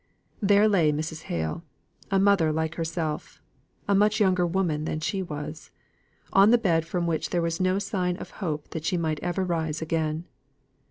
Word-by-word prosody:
There 205 Hz, +1 st, +5 dB
lay 175 Hz, -8 st, +3 dB
Mrs. 155 Hz, +2 st, -4 dB
Hale 80 Hz, -2 st, -2 dB, 0.5 s
a 195 Hz, -, +2 dB
mother 195 Hz, -5 st, +4 dB
like 160 Hz, +1 st, -1 dB
herself 165 Hz, -2 st, -4 dB, 0.5 s
a 200 Hz, -, +3 dB
much 210 Hz, +2 st, +3 dB
younger 185 Hz, -3 st, +3 dB
woman 165 Hz, -4 st, 0 dB
than 155 Hz, -, -2 dB
she 190 Hz, +5 st, -2 dB
was, 155 Hz, -2 st, -6 dB, 0.6 s
on 195 Hz, +2 st, +7 dB
the 240 Hz, -, +6 dB
bed 165 Hz, -7 st, +1 dB
from 175 Hz, 0 st, -1 dB
which 165 Hz, -2 st, -1 dB
there 175 Hz, -, 0 dB
was 165 Hz, 0 st, -1 dB
no 185 Hz, +1 st, +2 dB
sign 185 Hz, -3 st, -1 dB
of -, -, -9 dB
hope 155 Hz, -5 st, -3 dB
that 160 Hz, -, -5 dB
she 180 Hz, +2 st, 0 dB
might 160 Hz, -3 st, -1 dB
ever 175 Hz, +2 st, -1 dB
rise 160 Hz, -4 st, -1 dB
again. 160 Hz, 0 st, -1 dB
170 Hz, 175 wpm, -26 LUFS, 155-190 Hz, 0.6 s, on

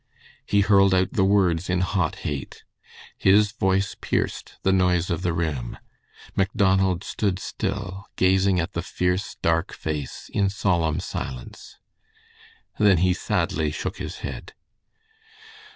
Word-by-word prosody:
He 100 Hz, -, +3 dB
hurled 100 Hz, -1 st, +5 dB
out 95 Hz, +5 st, +1 dB
the 105 Hz, -6 st, +2 dB
words 95 Hz, -3 st, +2 dB
in 90 Hz, 0 st, +1 dB
hot 90 Hz, -3 st, 0 dB
hate. 70 Hz, -2 st, -5 dB, 0.6 s
His 100 Hz, +2 st, +4 dB
voice 95 Hz, -2 st, 0 dB
pierced -, -, -2 dB
the 95 Hz, -, +3 dB
noise 90 Hz, -1 st, +2 dB
of 85 Hz, -, -1 dB
the 90 Hz, -2 st, 0 dB
room. 80 Hz, -7 st, -3 dB, 0.6 s
Macdonald 95 Hz, -1 st, +2 dB
stood 100 Hz, -4 st, -1 dB
still, 95 Hz, 0 st, -4 dB
gazing 95 Hz, 0 st, +3 dB
at 85 Hz, +4 st, -2 dB
the 85 Hz, -, -2 dB
fierce, 90 Hz, +2 st, -1 dB
dark 80 Hz, 0 st, +1 dB
face 75 Hz, -4 st, -5 dB
in 100 Hz, -1 st, +2 dB
solemn 85 Hz, -5 st, 0 dB
silence. 65 Hz, -8 st, -7 dB, 1.0 s
Then 105 Hz, -3 st, +5 dB
he 90 Hz, -, +3 dB
sadly 80 Hz, -3 st, -1 dB
shook 75 Hz, -, -4 dB
his -, -, -5 dB
head. -, -, -7 dB
95 Hz, 130 wpm, -24 LUFS, 85-95 Hz, 1.0 s, hurled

